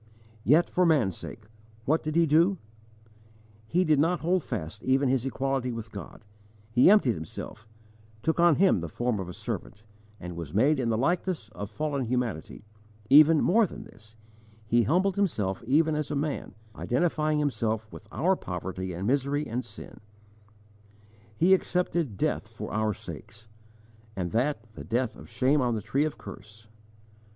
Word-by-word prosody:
Yet 155 +7 +4
for 180 - +1
man's 140 - +3
sake 105 - -9 0.4
what 155 +4 +2
did 155 0 -4
he 170 0 +5
do? 165 +6 +3 1.1
He 180 +7 +2
did 155 -4 +3
not 170 +4 +2
hold 180 +2 +1
fast 105 -3 -5
even 135 +1 +2
His 130 0 +1
equality 135 -1 -1
with 115 -2 -7
God, 100 +1 -10 0.5
He 125 +8 +6
emptied 200 - +5
Himself, 110 +6 -8 0.6
took 160 +1 0
on 170 -2 +6
Him 190 - +4
the 85 -1 -5
form 120 +5 -1
of 90 -2 -5
a - - -7
servant, 105 - -6 0.4
was 85 -2 -7
made 135 +7 +3
in 120 -3 0
the 110 - +1
likeness 165 - -1
of 105 -1 -7
fallen 145 -1 -2
humanity; 115 -6 -3 0.5
even 155 +2 +8
more 220 +3 +4
than - - -9
this, 110 0 -17 0.5
He 120 +2 +3
humbled 180 - +1
Himself 105 - -1
even 155 +4 +3
as 150 -1 -2
a 150 - -2
man, 145 +1 -3 0.2
identifying 155 +2 0
Himself 115 -7 -1
with 105 - -12
our 185 +4 +2
poverty 95 - -5
and 90 +3 -4
misery 140 +4 0
and 120 +3 -3
sin; 110 -2 -11 1.4
He 180 - +5
accepted 175 - 0
death - - -1
for - - -8
our 110 -1 0
sakes, 110 +1 -10 0.7
and 90 -2 -3
that, 120 +1 0
the - - -9
death 120 0 -1
of - - -13
shame 130 +5 +2
on 120 -2 +1
the 110 - -3
tree 140 +8 +1
of 155 - -4
curse. 110 +2 -12
130 Hz, 160 wpm, -27 LUFS, 110-155 Hz, 1.4 s, even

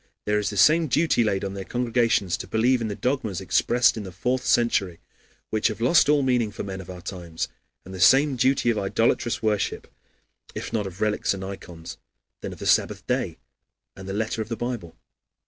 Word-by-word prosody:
There 105 0 +1
is 105 - -1
the 100 - -6
same 155 - +5
duty 150 -2 +2
laid 100 -3 0
on 95 - -4
their 100 -1 -5
congregations 115 -5 +1
to - - -7
believe 120 +3 +2
in 115 - -1
the 105 - -4
dogmas 110 -3 -2
expressed 120 +5 +2
in 110 - -4
the 95 -2 -8
fourth 125 +8 -1
century, 100 -7 +1 0.5
which 110 0 +2
have 110 - -4
lost 140 +5 +4
all 145 -1 +4
meaning 125 -4 +1
for 105 - -7
men 95 -1 -6
of 90 - -13
our 90 -1 -9
times, 85 -4 -5 0.4
and 95 - -10
the 95 - -7
same 135 +8 +5
duty 130 -1 +2
of 110 - -1
idolatrous 115 +4 0
worship, 105 -2 -1 0.7
if - - -6
not 105 -3 -1
of 95 0 -10
relics 105 -2 +1
and 95 0 -6
ikons, 90 -4 -9 0.4
then - - -5
of - - -9
the - - -7
Sabbath - - +2
Day - - -1 0.6
and 95 0 -9
the - - -3
letter 110 +2 -2
of 110 - -6
the 115 - -3
Bible. 120 -8 -5
110 Hz, 205 wpm, -24 LUFS, 95-120 Hz, 0.7 s, same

